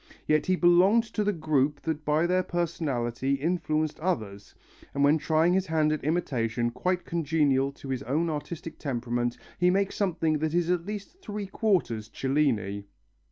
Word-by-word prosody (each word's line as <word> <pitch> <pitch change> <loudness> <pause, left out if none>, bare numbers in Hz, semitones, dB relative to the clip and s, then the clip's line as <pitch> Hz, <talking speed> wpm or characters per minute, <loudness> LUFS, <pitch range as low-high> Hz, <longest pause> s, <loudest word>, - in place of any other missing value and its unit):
Yet 155 0 +2
he 185 - +3
belonged 180 +6 +5
to 215 - 0
the 205 - +2
group 150 -4 0
that 160 -2 -2
by 155 +3 +2
their 180 +1 +2
personality 140 -8 -1
influenced 155 0 -1
others, 110 - -3 0.4
and 140 - +2
when 150 +3 +4
trying 160 +3 +2
his 190 0 +1
hand 155 -2 +2
at 155 - -4
imitation 120 -7 0
quite 180 +8 -1
congenial 145 -4 +1
to 135 - -10
his 130 -2 -2
own 155 +7 0
artistic 160 +1 -5
temperament 120 -3 -2 0.2
he 180 0 +4
makes 195 +2 +1
something 165 -6 0
that 160 +1 -1
is 175 0 +2
at 175 0 -1
least 210 - -7
three 210 - -5
quarters 180 - 0
Cellini. 115 -8 0
155 Hz, 160 wpm, -27 LUFS, 135-175 Hz, 0.4 s, belonged